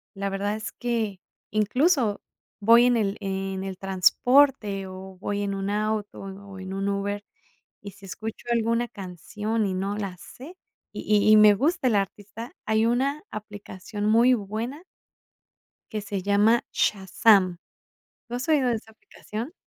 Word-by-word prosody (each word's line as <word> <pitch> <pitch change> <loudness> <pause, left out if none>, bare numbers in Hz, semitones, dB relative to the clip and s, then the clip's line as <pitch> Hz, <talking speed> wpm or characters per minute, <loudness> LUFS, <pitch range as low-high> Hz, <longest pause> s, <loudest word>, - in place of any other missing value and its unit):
la 200 0 -2
verdad 200 +2 -2
es 215 -1 -6
que 225 -5 -2 0.3
incluso, 230 - +2 0.4
voy 230 +3 +7
en 245 0 +4
el 205 -2 0
en 195 -1 -3
el 190 -1 -5
transporte, 200 +2 +3
o 190 0 -10
voy 205 +1 -2
en 200 -1 -2
un 195 0 -3
auto, 215 0 -2
o 195 - -7
en 190 - -9
o 200 -1 -11
en 190 0 -6
un 195 +1 -1
Uber, 200 +1 -2 0.6
y 200 - -8
si 200 +1 -15
escucho 220 +5 -7
alguna 230 +1 +1
canción 210 +4 -3
y 190 - -2
no 195 +2 -2
la 195 -3 -4
sé, 295 - -12 0.4
y - - -5 0.3
y - - +8
y 215 - +8
me 210 -1 +8
gusta 305 - +1
el 230 - +2
artista, 205 +4 -4
hay 220 +1 +2
una 270 +5 0
aplicación 205 0 -7
muy 235 +4 +5
buena. 225 - -5 1.1
Que 215 -2 -3
se 200 -1 -4
llama 205 +4 +3
Shazam, 190 -2 +3 0.7
¿no 240 - -3
has 250 +4 -4
oído 290 -5 +3
esa 220 -1 -3
aplicación? 220 +4 -8
210 Hz, 160 wpm, -25 LUFS, 195-230 Hz, 1.1 s, y